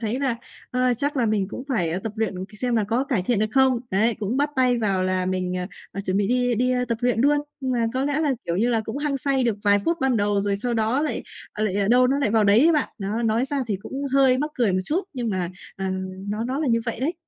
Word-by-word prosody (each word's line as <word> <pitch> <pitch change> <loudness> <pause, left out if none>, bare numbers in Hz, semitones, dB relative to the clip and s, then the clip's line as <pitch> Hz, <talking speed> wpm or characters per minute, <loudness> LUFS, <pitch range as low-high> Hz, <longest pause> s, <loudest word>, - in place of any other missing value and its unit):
thấy 225 +2 -2
là, 265 -4 0 0.3
ờ, 250 0 +2
chắc 285 +4 -2
là 245 - +2
mình 210 -3 0
cũng 255 - -6
phải, 180 -11 0
a, 175 - -1
tập 210 +2 -5
luyện 200 -4 -2
c - - -14
xem 245 0 0
là 220 - +2
có 230 +6 0
cải 255 -9 0
thiện 225 +3 +1
được 215 - +2
không. 260 -1 +3
Đấy, 220 +4 +2
cũng 210 +4 -1
bắt 290 +2 +1
tay 250 -2 +3
vào 195 -4 +1
là 185 0 0
mình, 185 -1 -1
à, 180 0 -3 0.3
à, 195 - -4
chuẩn 190 -1 -1
bị 200 0 +2
đi 245 0 +2
đi, 250 +3 +1
ơ, 250 0 +1
tập 235 -2 -2
luyện 245 -2 +1
luôn. 290 +3 +4 0.2
Nhưng 260 -2 -1
mà 235 -2 +1
có 260 +1 0
lẽ 290 +1 0
là, 300 -3 +2
kiểu 170 - -1
như 225 +6 +2
là, 230 -2 +2
cũng 220 +5 -4
hăng 290 -1 -1
say 270 -1 +1
được 230 -4 +1
vài 205 0 +5
phút 335 - +1
ban 265 -2 +2
đầu 205 -1 +1
rồi 200 0 0
sau 245 -1 0
đó 225 +5 +1
lại, 310 - -2 0.3
ờ, 215 - -2
lại 200 -1 0
đâu 250 +2 +5
nó 270 +2 +1
lại 275 -7 +1
vào 220 -1 +3
đấy 205 +1 +5
ấy 330 +5 +5
bạn. 300 -3 +1
Đó, 210 +3 -2
nói 225 +2 +2
ra 285 +2 -3
thì 210 -3 -1
cũng - - -9 0.2
hơi 265 -2 +4
mắc 300 +3 -1
cười 230 -6 +2
một 185 - +1
chút 335 - 0
nhưng 245 -4 -3
mà, 185 -3 -1 0.3
à, 190 0 -2 0.4
nó 210 +2 -2
nó 260 +3 -2
là 310 - -1
như 230 -1 +3
vậy 230 0 -3
đấy. 305 +7 0
235 Hz, 290 wpm, -24 LUFS, 205-260 Hz, 0.4 s, vài